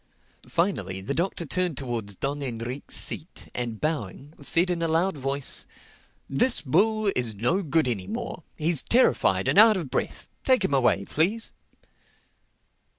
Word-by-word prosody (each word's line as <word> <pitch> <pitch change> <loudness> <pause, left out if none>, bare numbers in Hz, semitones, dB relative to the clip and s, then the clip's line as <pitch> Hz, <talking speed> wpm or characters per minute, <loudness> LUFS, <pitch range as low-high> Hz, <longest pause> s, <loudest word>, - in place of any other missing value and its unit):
Finally 100 - 0
the 100 +8 -3
Doctor 170 +1 -2
turned 180 -1 -1
towards 115 -6 -4
Don 140 +7 -3
Enrique's 125 +1 -5
seat 160 - -3
and 120 -3 -3
bowing 145 - -3
said 175 +5 +2
in 170 -1 -2
a 165 - +1
loud 165 +4 +1
voice, 135 0 -1 0.6
"This 230 - +3
bull 210 +8 +2
is 120 -4 -1
no 120 - +1
good 160 -4 +1
any 105 -7 -1
more. 235 -5 -5 0.2
He's 160 -2 +1
terrified 255 +2 +3
and - - +4
out 220 -1 +8
of 155 -8 -5
breath. - - -3 0.2
Take 255 -6 +3
him 140 - -1
away, 120 -7 +3
please." 200 - 0
150 Hz, 150 wpm, -26 LUFS, 125-185 Hz, 0.6 s, out